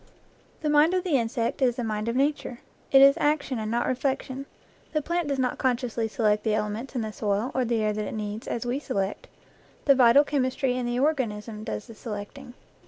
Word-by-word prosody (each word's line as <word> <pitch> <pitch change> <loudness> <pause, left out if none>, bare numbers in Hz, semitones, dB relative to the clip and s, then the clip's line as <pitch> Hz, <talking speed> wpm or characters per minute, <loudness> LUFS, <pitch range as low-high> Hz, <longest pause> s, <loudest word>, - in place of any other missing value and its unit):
The 305 - +1
mind 305 +4 +5
of 365 - 0
the 315 -8 +2
insect 230 +3 -2
is 245 -3 +3
the 245 - -3
mind 215 -1 -2
of 235 - -2
Nature; 275 -3 -1 0.3
it 270 0 +8
is 275 0 +8
action 290 -4 0
and 215 0 -3
not 235 +2 0
reflection. 265 +1 -2 0.5
The 305 - +1
plant 340 0 -1
does 280 -1 -1
not 255 -1 -1
con 255 -2 +2
sciously 235 -3 -3
select 210 -1 +1
the 215 -2 +1
elements 215 +5 -3
in 245 - 0
the 215 -1 -4
soil 210 +5 -1
or 260 - +1
the 230 -2 0
air 215 0 +1
that 210 0 -3
it - - -5
needs, 210 +1 -5
as 235 - -3
we 245 +3 -1
select; 200 -9 -3 0.6
the 280 - +7
vital 255 +1 +6
chemistry 265 -2 0
in 250 -1 -2
the 240 0 -1
organism 225 -7 -1
does 215 -2 -5
the 230 - -11
selecting. 230 +4 -8
245 Hz, 215 wpm, -26 LUFS, 220-275 Hz, 0.6 s, it